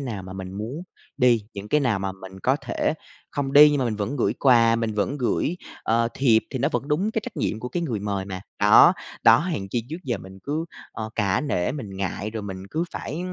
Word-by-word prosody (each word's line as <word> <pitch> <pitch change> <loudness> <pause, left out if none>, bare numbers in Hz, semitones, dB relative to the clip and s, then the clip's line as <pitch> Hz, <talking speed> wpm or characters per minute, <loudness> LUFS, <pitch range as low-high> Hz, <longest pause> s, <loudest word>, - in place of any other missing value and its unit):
nào 115 -8 -4
mà 95 - -9
mình 95 -1 -7
muốn 115 - -5 0.3
đi, 120 -4 +3
những 100 +1 -7
cái 150 - +3
nào 120 -7 +1
mà 95 0 -3
mình 95 0 -11
có 130 +2 +2
thể 155 - -1 0.4
không 140 -1 -2
đi 150 +1 +9
nhưng 145 - +1
mà 130 - +1
mình 115 -3 -1
vẫn 110 +7 -2
gửi 120 - +1
quà, 115 -3 +5
mình 115 -2 -2
vẫn 120 +8 -1
gửi, 145 +7 0 0.3
ờ, 115 +1 +2
thiệp 115 -5 +4
thì 130 - -3
nó 140 +4 +2
vẫn 140 - -2
đúng 180 +9 +1
cái 220 - -1
trách 250 - -8
nhiệm 110 - -1
của 125 - -4
cái 175 - -2
người 120 -11 -2
mời 100 -2 -2
mà. 95 -1 -6 0.2
Đó, - - +8 0.3
đó, - - +7
hèn 150 - -3
chi 115 +1 -1
trước 160 - -3
giờ 120 -6 -1
mình 95 +1 -12
cứ, 155 +3 -2 0.3
ờ, 110 -1 -5
cả 100 -2 +1
nể 110 -12 -1
mình 110 -9 -7
ngại, 100 +2 -3
rồi 110 -1 -5
mình 95 -1 -7
cứ 160 +2 -1
phải 155 - -5
115 Hz, 245 wpm, -24 LUFS, 100-140 Hz, 0.4 s, đi